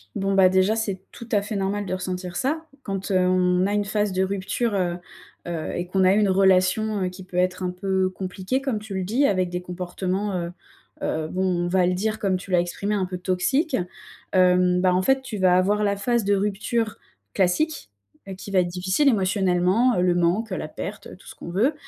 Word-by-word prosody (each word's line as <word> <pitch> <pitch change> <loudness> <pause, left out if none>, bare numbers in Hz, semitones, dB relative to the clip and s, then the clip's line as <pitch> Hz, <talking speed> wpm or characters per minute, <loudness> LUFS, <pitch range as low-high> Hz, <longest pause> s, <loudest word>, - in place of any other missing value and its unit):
Bon, 195 0 0
bah, 190 -1 +6
déjà, 190 +4 +2
c'est 200 -4 -2
tout 235 - -10
à 205 - +4
fait 205 +1 -4
normal 200 +1 -1
de 185 - -3
ressentir 180 -1 -4
ça. 315 +4 -1 0.2
Quand 195 0 -4
on 185 0 +3
a 205 - -1
une 205 0 +1
phase 205 -1 0
de 185 +1 +1
rupture, 200 +4 -1
heu 180 -3 0 0.5
heu 170 -2 -4
et 175 - -2
qu'on 190 0 +2
a 185 - +5
eu 205 - +3
une 205 -2 +3
relation, 190 +2 +3
heu, 180 - 0
qui 185 +1 -10
peut 180 - -12
être 185 +1 +1
un 180 - 0
peu 190 +1 0
compliquée, 190 +7 -3
comme 265 -6 -1
tu 210 -1 -9
le 190 -1 -2
dis, 240 +9 +1
avec 185 -6 +1
des 180 0 -4
comportements, 185 +3 -3
heu 170 0 -4 0.5
heu, 155 0 -1
bon, 180 -1 0
on - - -1
va 180 0 +2
le 180 - +1
dire, 215 +4 -1
comme 190 -2 +1
tu 190 - -11
l'as 180 -1 +4
exprimé, 200 +4 -2
un 190 -2 0
peu 180 0 -5
toxiques. 200 - 0 0.6
Hem, 180 -1 +4
bah, 180 0 +3
en 185 - +2
fait, 265 +7 +2
tu 235 -5 -6
vas 185 -1 +4
avoir 205 +3 +2
la 200 -1 +1
phase 235 +3 0
de 200 +1 +2
rupture 210 +3 -1 0.4
classique 190 - 0 0.5
qui 200 - -9
va 190 - +4
être 180 - +2
difficile 185 +11 +1
émotionnellement. 190 +2 +2
Heu, - - +2
le 180 -1 +2
manque, 185 +5 +1
heu, - - -1
la 155 - -5
perte, - - -7
tout - - -19
ce - - -10
qu'on - - -9
veut. 220 - +2
190 Hz, 220 wpm, -24 LUFS, 180-210 Hz, 0.6 s, bah